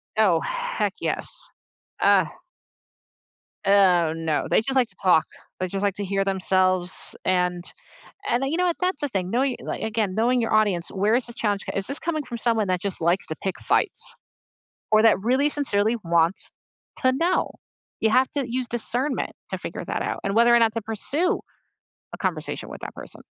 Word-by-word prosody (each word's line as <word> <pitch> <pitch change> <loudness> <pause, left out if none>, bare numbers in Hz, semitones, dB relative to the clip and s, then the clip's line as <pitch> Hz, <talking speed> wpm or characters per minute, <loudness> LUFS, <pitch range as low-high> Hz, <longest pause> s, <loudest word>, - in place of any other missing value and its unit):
Oh, 195 -7 +4
heck - - -2
yes. - - -1 0.8
Ugh. 195 -4 +5 1.4
Oh, 185 -5 +4
no, 160 -2 -1
they - - +4
just 270 +4 -2
like 250 -3 +4
to - - -9
talk. 180 -4 +4 0.3
They 185 - -1
just 195 +2 -3
like 200 -2 +1
to 205 -1 -3
hear 195 +1 0
themselves. 185 -1 +1
And 180 -1 +1 0.7
and 240 - +2
then 270 - 0
you 325 - 0
know 360 - +2
what, 345 -2 0
that's 365 -4 0
the 290 - +1
thing, 190 -8 -2
knowing 255 +4 +1
li - - -5
again, 215 -4 -1
knowing 245 +3 +2
your 225 - -1
audience, 205 -6 +2
where 205 +4 +2
is 245 0 0
the 235 - -7
challenge 205 -3 -1
c - - -3
is 195 - -1
this 275 - -1
coming 310 -3 -2
from 240 -2 -6
someone 225 -3 +1
that 180 -1 0
just 200 -2 -2
likes 170 +4 +2
to 155 - -4
pick 190 - -2
fights, - - 0 0.8
or 215 0 +6
that 225 -4 +5
really 260 +7 +2
sincerely 225 -7 +2
wants 170 +1 +1 0.5
to 255 - +4
know? 335 +7 +1 0.5
You 220 - +2
have 255 +1 +4
to 280 -2 -1
use 250 0 -2
discernment 245 +4 -2 0.2
to - - -3
figure - - -6
that - - -3
out - - -2
and 195 +1 -1
whether 235 +1 +6
or - - +6
not 225 -1 +3
to 230 - -2
pursue 275 - -1 0.7
a - - -6
conversation - - -3
with - - -9
that - - -7
person. - - -11
215 Hz, 195 wpm, -24 LUFS, 185-255 Hz, 1.4 s, or